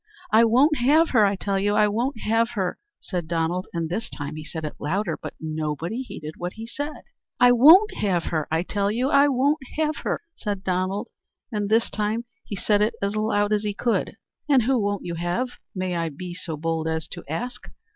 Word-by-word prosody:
"I 225 +1 +6
won't 275 +7 +4
have 305 +7 +4
her, 220 -5 +5
I 200 - 0
tell 195 0 -1
you; 205 +1 +1
I 210 0 +5
won't 230 +4 -1
have 225 +1 +2
her!" 185 -3 -1 0.2
said 175 -4 -4
Donald; 170 +2 -1
and 165 -1 -2
this 200 +8 -3
time 145 0 -6
he 155 - -6
said 160 +1 -6
it 150 - -4
louder; 170 +2 -1
but - - -8
nobody 160 - -3
heeded 155 -11 -8
what 175 +1 -4
he 225 - -8
said. 290 +6 -5 0.4
"I 245 0 +7
won't 320 - +7
have 185 -5 +1
her, 155 -3 -2
I 160 +2 +1
tell 200 +1 -1
you; 245 +5 0
I 280 0 +6
won't 280 +3 +2 0.2
have 310 -1 0
her!" - - -2
said 205 -8 -4
Donald; 190 +4 -1 0.4
and 205 -2 -2
this 225 +2 +2
time 215 +3 -1 0.2
he 205 - -6
said 205 +2 +2
it 210 - +1
as 200 +1 -1
loud 215 -1 +1
as 210 - +2
he 205 -1 -3
could. 235 +1 -1 0.3
"And 265 -4 +5
who 260 +1 +2
won't 205 0 -1
you 175 - -3
have, 175 +10 -1 0.3
may 185 -1 -2
I 165 -1 -1
be 175 +4 -7
so 170 -3 -5
bold 160 +1 -1
as 160 -1 -2
to 175 - -8
ask?" 245 +11 -5
205 Hz, 210 wpm, -24 LUFS, 170-235 Hz, 0.4 s, I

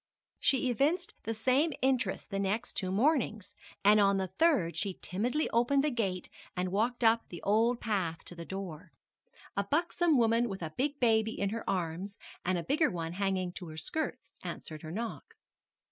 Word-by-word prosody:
She 260 -2 +3
evinced 310 +9 +1
the 225 - -1
same 260 +8 +2
interest 255 -7 0
the 195 - -1
next 205 +5 -1
two 185 - -2
mornings, 225 -2 +1 0.3
and 210 +1 +7
on 200 -1 +4
the 190 -1 -1
third 225 - +2
she 200 -2 -2
timidly 245 +11 -1
opened 245 +4 +3
the 300 - +1
gate 195 -7 -1 0.3
and 180 0 -1
walked 235 +5 0
up 225 0 +4
the 175 - -8
old 230 +4 +3
path 185 -7 -2
to - - -5
the 170 -1 -7
door. 180 -3 -7 0.6
A 200 - +1
buxom 330 - +2
woman 230 0 +3
with 190 -3 -5
a 160 - -4
big 285 +2 -1
baby 225 -2 +2
in 200 - +1
her 225 +2 -4
arms, 185 +2 -2 0.3
and 185 0 +1
a 170 - -2
bigger 305 - +2
one 165 -2 -4
hanging 190 -1 0
to 180 - -7
her 155 0 -9
skirts, 315 - -4
answered 155 -1 -7
her 155 - -7
knock. 225 +5 -5
215 Hz, 180 wpm, -31 LUFS, 185-250 Hz, 0.6 s, and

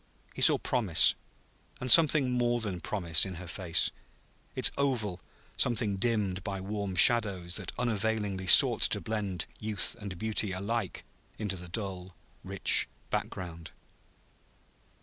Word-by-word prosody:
He - - -9
saw - - +5
promise, 105 -10 +4 0.7
and 125 0 +1
something 155 -5 +5
more 120 -1 -1
than 100 -6 -2
promise, 85 -6 0
in 95 -2 -5
her 90 +2 -10
face, 85 -1 0 0.6
its - - +4
oval 115 -10 -3 0.4
something 115 -5 +1
dimmed 100 -4 -2
by 100 -1 -6
warm 100 0 -6
shadows 95 -3 +4
that 95 -4 -7
unavailingly 105 -4 -3
sought - - +7
to - - +2
blend 105 -5 -5
youth 110 -1 -3
and 100 -4 -9
beauty 105 0 -2
alike 100 +1 -5 0.3
into 105 -3 -4
the 90 0 -7
dull, 95 -2 -7 0.3
rich - - +1 0.2
background. 85 -3 -6
100 Hz, 130 wpm, -28 LUFS, 95-115 Hz, 0.7 s, sought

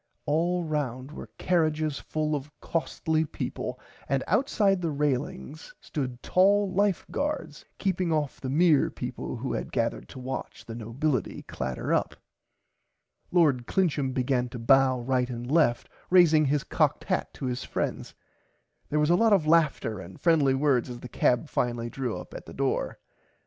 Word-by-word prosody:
All 170 +4 +1
round 140 -4 -3
were - - -9
carrages 155 -4 +1
full 155 0 -2
of 145 0 -5
costly 160 -1 -1
peaple 155 - -5 0.3
and 135 0 +1
outside 205 -7 +2
the 170 - 0
railings 145 +1 -3
stood 125 -4 -5
tall 195 +1 +3
Life 200 -1 +1
Guards 285 - -3
keeping 185 -3 0
off 150 -3 -1
the 130 - -3
mere 155 0 +4
peaple - - -5
who - - -3
had - - -4
gathered - - -1
to - - -11
watch 130 +1 -6
the 115 - -7
nobility 120 - -2
clatter 65 0 -3
up. - - 0 1.1
Lord 145 -9 +3
Clincham 150 -8 +1
began 125 -1 0
to 125 - -7
bow 130 +2 +4
right 125 0 0
and 120 -1 -5
left 145 -7 +3 0.2
raising 165 -4 +6
his 145 0 +1
cocked - - +1
hat - - -1
to - - -5
his 125 -1 -2
friends. - - -3 0.7
There 150 - +1
was 150 +2 +3
a - - +6
lot 225 +3 +4
of 185 -6 +3
laughter 155 - +2
and 95 0 -10
friendly 150 -6 +3
words 135 -3 +2
as 120 -1 -7
the 125 - -8
cab 125 +5 +1
finally 120 -3 -1
drew 125 -7 -3
up 90 - -10
at - - -9
the - - -9
front - - -14
door. - - -1
145 Hz, 165 wpm, -27 LUFS, 125-165 Hz, 1.1 s, raising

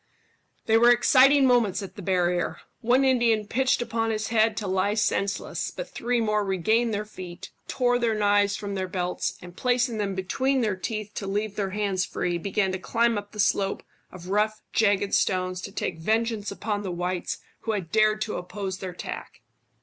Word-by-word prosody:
They 225 0 +4
were 240 +1 +6
exciting 265 +3 +6
moments 220 -6 +2
at 190 0 -9
the 205 - -8
barrier. 180 -1 0 0.2
One 250 +4 +3
Indian 235 -5 +3
pitched 255 +3 +1
upon 225 -1 -1
his 215 -1 -2
head 225 -1 +2
to 215 - -3
lie 190 +2 +1
senseless, 205 -2 -1
but - - -7
three 245 +1 -1
more 210 -2 +1
regained 220 +5 +1
their 210 0 -2
feet, 185 -2 -9 0.2
tore 245 -1 +1
their 230 -2 +1
knives 205 -1 +3
from 205 -1 -5
their 190 -1 -2
belts, 180 0 -2
and 175 0 -11
placing 245 -1 +1
them 200 -2 -1
between 260 +8 0
their 210 -4 0
teeth 215 +2 -4
to 195 - -5
leave 205 +1 -2
their 200 -2 -1
hands 195 -2 -1
free, 175 -1 -2
began 195 +1 0
to 185 - -3
climb 230 +4 +1
up 205 0 -5
the 210 - -11
slope 200 -1 +1 0.3
of 180 0 -10
rough 215 +2 0
jagged 205 -2 +2
stones 185 -1 +1
to 200 - -7
take 170 -4 -3
vengeance 220 +3 0
upon 205 +1 -3
the 195 - -4
whites 180 +1 -2 0.2
who 225 - -2
had 185 -6 -4
dared 215 0 +3
to 215 - -2
oppose 190 +1 -5
their 190 - -5
attack. - - -8
210 Hz, 190 wpm, -26 LUFS, 190-225 Hz, 0.3 s, were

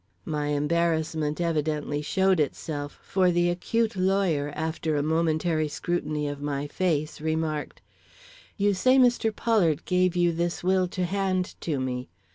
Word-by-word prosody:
My 150 -1 -2
embarrassment 155 0 0
evidently 150 -3 -1
showed 190 +3 +2
itself, 145 0 -3
for 185 -1 +2
the 175 0 +2
acute 225 +5 -1
lawyer, 185 -6 +1
after 160 0 -2
a 145 - +1
momentary 160 0 +1
scrutiny 150 -1 -2
of 145 0 -5
my 145 -1 -2
face, 155 -2 -1
remarked: 155 -1 -2 0.7
"You 205 0 +2
say 255 +8 +4
Mr. 245 -3 +4
Pollard 195 -9 +1
gave 180 -1 +2
you 175 -1 +3
this 170 +1 -2
will 185 0 +2
to 180 0 -2
hand 185 -1 -1
to 150 -5 -1
me. 125 -1 -3
165 Hz, 140 wpm, -26 LUFS, 150-185 Hz, 0.7 s, say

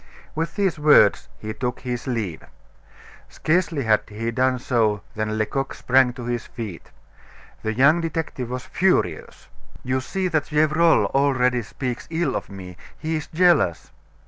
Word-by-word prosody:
With 165 +1 -3
these 195 -6 0
words 150 -9 +5
he 110 0 -6
took 125 0 -4
his 125 -1 -4
leave. 110 -10 -3 0.9
Scarcely 165 -3 0
had 110 -2 +3
he 115 +2 -4
done 130 +2 +1
so 110 -5 0
than 110 0 -2
Lecoq 135 +5 -2
sprang 130 0 +3
to 125 -1 -8
his 120 -1 -3
feet. 110 -8 -8 0.7
The 110 - -2
young 145 +7 +4
detective 160 -7 -4
was 125 0 -5
furious. 135 - -1 0.4
"You 130 +1 -1
see 190 +7 -2
that 160 -3 -1
Gevrol 155 -5 +3
already 125 -3 +2
speaks 120 +2 -5
ill 170 +1 -1
of - - -4
me; 90 -3 -10 0.2
he 160 +1 -3
is 155 - -6
jealous." 165 - +2
130 Hz, 145 wpm, -23 LUFS, 110-155 Hz, 0.9 s, words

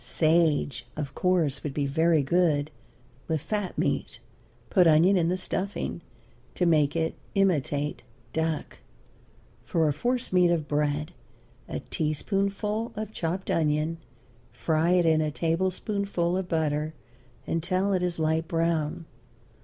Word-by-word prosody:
Sage, 150 -3 +1
of 145 -3 -4
course, 165 -7 +1
would 145 -3 -4
be 145 - 0
very 160 +2 +3
good 155 -1 +2 0.6
with 160 -1 0
fat 205 +5 -3
meat; - - -1 0.5
put 180 -4 +5
onion 165 +5 +5
in 170 -2 +2
the 180 - 0
stuffing 185 -1 -3 0.5
to 180 - +1
make 155 -3 +3
it 160 -1 0 0.2
imitate 150 -6 +1 0.3
duck. 160 -1 -2 0.8
For 165 -2 +1
a 150 - +2
force 245 - -1
meat 180 -1 +5
of 165 -3 0
bread, 150 +1 0 0.6
a - - -4
teaspoonful 200 +8 -1
of 215 0 -4
chopped 180 +2 -2
onion; 155 +1 +1 0.5
fry 155 +8 +1
it 180 -1 +4
in 160 -1 +4
a 155 - 0
tablespoonful 180 +3 -1
of 185 -1 -2
butter 155 -1 0 0.5
until 185 +4 0
it 185 - +1
is 180 -1 0
light 160 0 0
brown. 165 -1 -1
165 Hz, 130 wpm, -27 LUFS, 150-180 Hz, 0.8 s, put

